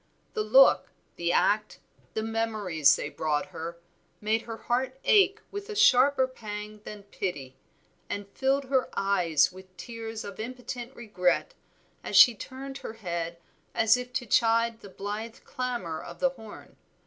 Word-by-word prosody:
The 435 - -1
look, - - +6 0.3
the 170 0 -1
act, 210 +4 +2 0.4
the 220 - -1
memories 215 -9 +2
they - - -4
brought 155 +3 -1
her, 170 -1 -6 0.4
made 220 +1 0
her 225 - -5
heart 255 +3 -2
ache 405 0 +4
with 405 +1 -6
a 430 - -5
sharper 265 -7 +5
pang 210 -4 -8
than 210 -1 -8
pity, 145 -10 -5 0.5
and 205 0 -4
filled 270 +5 0
her 260 -1 0
eyes 180 -6 +2
with 185 0 -15
tears 225 +3 -6
of 200 0 -9
impotent 250 +1 -6
regret, 205 - 0 0.5
as - - -4
she 245 - +10
turned 270 +4 -8
her 220 - -7
head 170 -5 -4 0.4
as 225 +1 +5
if 250 0 -5
to 245 - -2
chide 230 0 +2
the 200 - -12
blithe 210 +4 -5
clamor 240 -11 -4
of - - -10
the 270 - +3
horn. 225 -5 -13
225 Hz, 150 wpm, -28 LUFS, 190-255 Hz, 0.5 s, she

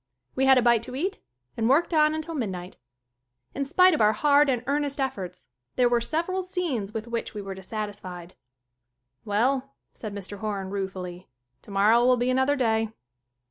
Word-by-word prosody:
We 265 - +1
had 265 -1 +7
a 250 - +3
bite 235 -2 +4
to 250 +2 -7
eat 375 +8 -2 0.4
and 225 0 0
worked 320 +6 +3
on 305 0 +4
until 315 +1 -5
midnight. 190 - -4 0.8
In 275 - -2
spite 365 +6 +5
of 305 - +1
our 210 0 +5
hard 290 +2 +4
and 250 -2 0
earnest 285 +1 -1
efforts 205 -10 -4 0.3
there 250 - +4
were 240 -1 +2
several 335 +9 -1
scenes 335 - -3
with 220 0 -5
which 235 -1 -4
we 205 - -4
were 195 0 -5
dissatisfied. 190 -3 -7 0.9
"Well," 260 +6 0 0.2
said 210 -3 -7
Mr. 200 0 -6
Horan 200 -3 -3
ruefully. 190 -2 -5 0.3
"Tomor 200 +1 +2
row 235 +1 +5
will 250 0 +4
be 245 +1 +1
another 265 +3 +2
day." 225 -4 +1
235 Hz, 175 wpm, -26 LUFS, 205-280 Hz, 0.9 s, had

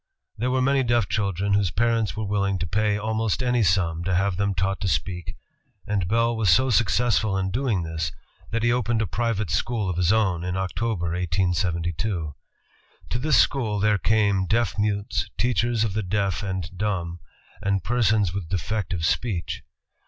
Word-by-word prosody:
There 125 +4 -1
were 130 0 +1
many 135 +1 +3
deaf 120 -4 +2
chil 100 -2 0
dren 100 +3 -1
whose 100 -2 +2
parents 115 0 0
were 110 - -2
willing 100 -1 0
to 90 - -2
pay 105 +4 +1
almost 110 +3 -1
any 125 -1 +2
sum 85 -3 +1
to 95 -1 +1
have 95 +1 +1
them 100 +1 0
taught 95 +1 -1
to 100 - 0
speak, 90 -2 -2 0.5
and 100 -4 -1
Bell 115 +3 +2
was 110 -4 +1
so 130 +9 +4
successful 110 -1 +2
in 95 0 -1
doing 115 -5 0
this, 80 -2 -3 0.4
that 115 0 -1
he 120 - +3
opened 120 -2 +1
a - - -1
private 110 -2 -1
school 105 +1 0
of 85 - -5
his 90 0 +3
own 95 -6 +1
in 90 +1 -2
October, 95 -1 -2
1872. 85 -1 -1 0.8
To 120 - -1
this 145 -1 +3
school 110 -7 +2
there 105 0 +2
came 100 -3 +2
deaf 110 -2 +1
mutes, 100 -2 -1
teachers 120 -2 +1
of 110 -4 -1
the 110 - -1
deaf 100 -2 -1
and 95 -3 -4
dumb, 90 -4 -2 0.4
and 100 -2 0
persons 110 -5 +2
with 95 -5 -4
defective 95 -2 -2
speech. 95 -2 -1
100 Hz, 175 wpm, -24 LUFS, 90-115 Hz, 0.8 s, so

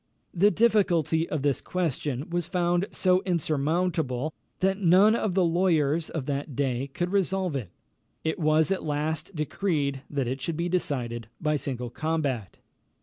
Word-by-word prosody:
The 195 +4 +5
difficulty 185 - +2
of 150 -3 -2
this 140 -2 +1
question 150 -5 -2
was 175 -1 -1
found 175 +1 +1
so 185 0 +2
insurmountable, 155 -4 0 0.2
that 190 +1 +1
none 195 +4 +6
of 210 -5 -1
the 190 - +4
lawyers 165 -3 +2
of 155 -5 -4
that 145 -1 -3
day 135 -1 -1
could 175 +6 -3
resolve 190 -4 0
it. 120 -9 -3 0.5
It 160 +2 -1
was 155 +2 +3
at 195 - 0
last 155 +4 -2
decreed 150 -3 -1
that 140 -4 -1
it 130 +2 -3
should 165 +1 -2
be 170 +1 -1
decided 120 -10 -2
by 150 -1 +1
single 125 -4 -4
combat. 145 -9 -2
160 Hz, 150 wpm, -27 LUFS, 140-180 Hz, 0.5 s, none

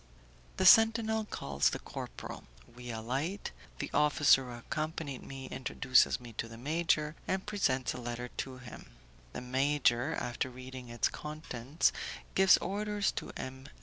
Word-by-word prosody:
The - - +1
sentinel 225 -1 +6
calls 70 - 0
the - - -3
corporal; - - -8 0.3
we 125 0 -9
alight, 130 - -3 0.3
the - - -4
officer 145 -2 +5
who 120 -1 -7
accompanied 155 +1 -4
me 135 -1 -8
introduces 130 0 +3
me 120 -2 -11
to - - -1
the 115 0 -10
major, 155 +2 0
and 190 0 -1
presents 140 -12 0
a 125 - -7
letter 120 +1 -4
to 130 -1 -4
him. 120 -1 -11 0.4
The - - -5
major, 130 +1 +2
after 120 +2 -2
reading 130 0 -9
its 120 -1 +1
contents, 150 -2 -1 0.4
gives 190 0 +7
orders 205 +1 -1
to - - -5
M. 130 +1 -7
135 Hz, 145 wpm, -32 LUFS, 125-160 Hz, 0.4 s, gives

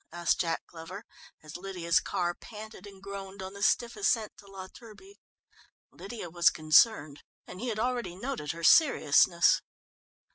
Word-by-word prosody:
asked 170 -1 0
Jack 165 -1 -2
Glover, 175 +6 -10 0.4
as 155 -1 -11
Lydia's 175 -2 0
car 175 -3 -2
panted 215 +2 -11
and 195 -1 -15
groaned 195 -1 -8
on 190 +1 -8
the 200 - -10
stiff 235 +2 +1
ascent 230 - 0
to 200 - -17
La 195 -1 -9
Turbie. 235 - -16 0.7
Lydia 200 -2 -8
was 170 -2 +4
concerned, 155 0 +3 0.2
and 185 - -11
he 250 - -4
had 220 -3 -3
already 235 -6 -2
noted 215 - -4
her 170 0 -9
seriousness. 315 - +4
195 Hz, 150 wpm, -29 LUFS, 170-220 Hz, 0.7 s, was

